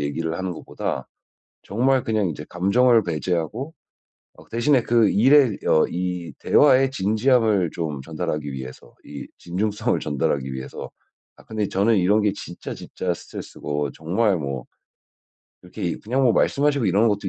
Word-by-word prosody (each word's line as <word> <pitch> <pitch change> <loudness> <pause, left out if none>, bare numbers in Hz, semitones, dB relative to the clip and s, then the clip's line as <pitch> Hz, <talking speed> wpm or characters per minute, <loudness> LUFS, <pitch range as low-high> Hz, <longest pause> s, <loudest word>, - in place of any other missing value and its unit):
얘기를 80 +3 -2
하는 95 -1 -3
것보다 85 - -5 0.6
정말 130 +5 +1
그냥 110 -4 0
이제 75 -2 -6
감정을 115 +6 +3
배제하고 90 - -3 0.6
어 - - -14
그 - - -30
대신에 125 +3 +3
그 115 -3 +3
일에 130 0 +5
어 80 - +4
이 90 -1 -3
대화의 135 -2 +4
진지함을 110 - +2
좀 75 -5 -4
전달하기 75 -1 -4
위해서 65 -1 -9
이 75 -1 -9
진중성을 100 +4 -1
전달하기 70 -2 -1
위해서. 65 0 -7 0.5
"아 - - -17
근데 110 -2 -3
저는 100 +4 +2
이런 100 +4 +3
게 105 - +2
진짜, 90 -3 -8
진짜 90 -1 -4
스트레스고 75 -3 -5
정말 95 +4 0
뭐 70 -4 -4 1.0
이렇게 90 - -10
이 85 - -1
그냥 130 +5 -1
뭐 120 - +4
말씀하시고 140 -1 +2
이러는 100 +5 +3
것도 100 -2 -1
95 Hz, 330 characters per minute, -23 LUFS, 80-115 Hz, 1.0 s, 일에